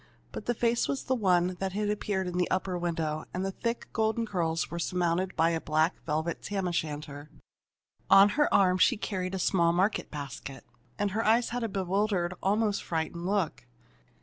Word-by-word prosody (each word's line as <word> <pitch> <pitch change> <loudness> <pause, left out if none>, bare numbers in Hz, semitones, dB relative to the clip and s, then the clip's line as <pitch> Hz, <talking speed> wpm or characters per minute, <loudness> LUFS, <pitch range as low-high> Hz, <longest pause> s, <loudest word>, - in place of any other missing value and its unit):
But - - -7
the 240 - +1
face 235 +1 +1
was 275 - -2
the 260 - 0
one 180 -5 +2
that 190 -1 -2
had 210 +1 0
appeared 205 -2 -2
in 180 0 -3
the 180 - +1
upper 185 0 -1
window, 165 -3 -2
and 185 +1 -1
the 195 - -1
thick 230 +4 -3
golden 220 +1 +1
curls 170 -5 -1
were 170 - -4
surmounted 180 +1 0
by 165 +1 +3
a 165 -1 -1
black 155 +3 0
velvet 160 +2 -1
tam 195 -2 -2
o' - - -1
shanter. 150 -2 -4 0.8
On 195 +1 +8
her 295 +7 +1
arm 185 -1 +4
she - - +4
carried 190 -3 -3
a - - -1
small 175 -2 +2
market 190 +5 +1
basket, 140 -2 -7 0.3
and 205 -1 0
her 220 +3 -1
eyes 230 +2 +3
had 245 0 -3
a 225 - -1
bewildered, 190 -1 0
almost 205 +1 +1
frightened, 170 +1 -3
look. 195 -5 -1
185 Hz, 190 wpm, -29 LUFS, 170-205 Hz, 0.8 s, On